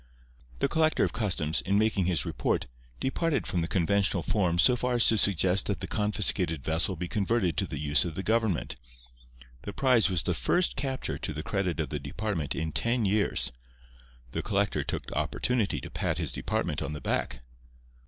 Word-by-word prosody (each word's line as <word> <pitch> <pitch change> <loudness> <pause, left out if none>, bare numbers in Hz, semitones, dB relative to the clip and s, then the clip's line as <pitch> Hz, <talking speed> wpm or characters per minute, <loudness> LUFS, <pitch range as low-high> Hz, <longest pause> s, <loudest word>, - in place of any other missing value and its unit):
The - - +1
Collector 160 -1 +2
of - - 0
Customs, 95 -9 -1
in 100 +1 +1
making 105 -3 +2
his 90 -3 0
report, - - -1 0.3
departed 145 +2 -1
from 90 - -1
the 80 - -1
conventional 95 0 +1
forms 90 -2 +2
so 125 - +6
far 125 +1 -1
as 120 -1 +4
to 110 - +3
suggest 95 0 +4
that 100 - -1
the - - -5
confiscated 95 -7 0
vessel 80 +5 +1
be 90 +1 -4
converted 100 -3 0
to - - 0
the - - -6
use 75 0 +3
of 85 -3 -5
the 95 - -3
government. 110 -5 0 0.9
The 100 - -7
prize 125 -5 +3
was 90 -4 0
the 90 - 0
first 175 - +1
capture 135 -2 -3
to - - -4
the 75 - -5
credit 90 -4 -2
of 75 -4 -2
the 75 - -3
department 90 -1 -3
in 80 0 -2
ten 115 +6 +1
years. 100 +1 +2 0.8
The - - -2
collector 100 -2 0
took - - -4
opportunity 110 - 0
to - - -9
pat - - -1
his - - -2
department - - -2
on 75 - -3
the 75 - -5
back. - - -2
100 Hz, 185 wpm, -28 LUFS, 85-110 Hz, 0.9 s, so